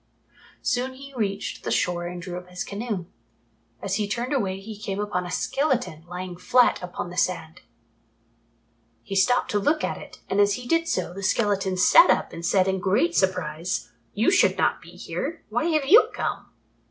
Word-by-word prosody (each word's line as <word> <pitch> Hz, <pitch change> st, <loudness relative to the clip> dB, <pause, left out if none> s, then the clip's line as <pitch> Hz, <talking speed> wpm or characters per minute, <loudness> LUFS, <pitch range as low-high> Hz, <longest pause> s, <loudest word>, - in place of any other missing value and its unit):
Soon 255 Hz, +1 st, -1 dB
he 275 Hz, +1 st, -11 dB
reached 200 Hz, -5 st, -3 dB
the -, -, -3 dB
shore 175 Hz, -1 st, 0 dB
and 175 Hz, 0 st, -6 dB
drew 175 Hz, 0 st, -6 dB
up 180 Hz, 0 st, -8 dB
his 180 Hz, 0 st, -4 dB
canoe. 205 Hz, -3 st, -4 dB, 0.8 s
As -, -, -1 dB
he 210 Hz, -1 st, -1 dB
turned 240 Hz, +7 st, -2 dB
away 195 Hz, -8 st, -1 dB
he 215 Hz, +2 st, -8 dB
came 200 Hz, -1 st, -5 dB
upon 205 Hz, -4 st, -2 dB
a -, -, -7 dB
skeleton 250 Hz, -, -1 dB
lying 180 Hz, 0 st, -6 dB
flat 245 Hz, +7 st, +3 dB
upon 175 Hz, -1 st, -5 dB
the 180 Hz, -, -9 dB
sand. 165 Hz, -4 st, -1 dB, 1.4 s
He 195 Hz, -, -5 dB
stopped 220 Hz, +6 st, +3 dB
to 205 Hz, -, +2 dB
look 305 Hz, +9 st, +1 dB
at -, -, -2 dB
it, -, -, -12 dB
and 195 Hz, -, 0 dB
as 205 Hz, 0 st, +3 dB
he 245 Hz, -1 st, -8 dB
did 330 Hz, +3 st, +2 dB
so, 185 Hz, -, -1 dB
the 195 Hz, -, -7 dB
skeleton 195 Hz, -1 st, +1 dB
sat -, -, +7 dB
up -, -, +2 dB
and 170 Hz, -, -7 dB
said 185 Hz, +2 st, +3 dB
in 190 Hz, 0 st, 0 dB
great 225 Hz, -, +2 dB
surprise, 180 Hz, -2 st, -1 dB, 0.2 s
"You 220 Hz, -, +3 dB
should 380 Hz, -, +4 dB
not -, -, +1 dB
be -, -, -14 dB
here. -, -, -5 dB
Why 310 Hz, -, 0 dB
have 310 Hz, -4 st, +1 dB
you 390 Hz, +11 st, +7 dB
come?" -, -, -4 dB
195 Hz, 190 wpm, -25 LUFS, 180-245 Hz, 1.4 s, sat